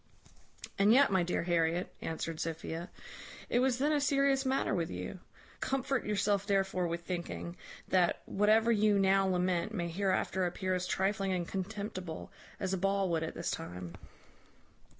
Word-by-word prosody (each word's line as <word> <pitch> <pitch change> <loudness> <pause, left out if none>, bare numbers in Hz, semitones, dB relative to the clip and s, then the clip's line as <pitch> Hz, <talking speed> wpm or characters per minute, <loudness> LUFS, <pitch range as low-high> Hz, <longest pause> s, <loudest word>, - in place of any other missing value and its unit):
"And 200 +2 +5
yet, 270 +1 +6
my 190 -2 +3
dear 175 0 0
Harriet," 170 0 0
answered 160 0 -4
Sophia, 165 +1 -4 0.6
"it 240 - +2
was 255 -1 +2
then 290 +4 +2
a 295 -1 +2
serious 275 -1 +2
matter 265 -4 +1
with 170 -4 0
you. 90 - -6 0.4
Comfort 270 -2 -1
yourself 205 -1 +1
therefore 195 -3 +1
with 170 +1 -3
thinking, 170 0 -4 0.3
that 180 -2 +2
whatever 215 +3 +3
you 210 -2 +4
now 195 0 +4
lament 180 +2 0
may 170 -3 -2
hereafter 190 0 0
appear 185 +1 -2
as 180 0 -1
trifling 195 0 0
and 175 -2 -2
contemptible 190 -3 -5 0.3
as 190 -1 -1
a 190 - 0
ball 195 0 +1
would 165 -2 +1
at 160 - -4
this 170 - -2
time." 90 - -6
190 Hz, 155 wpm, -32 LUFS, 170-210 Hz, 0.6 s, yet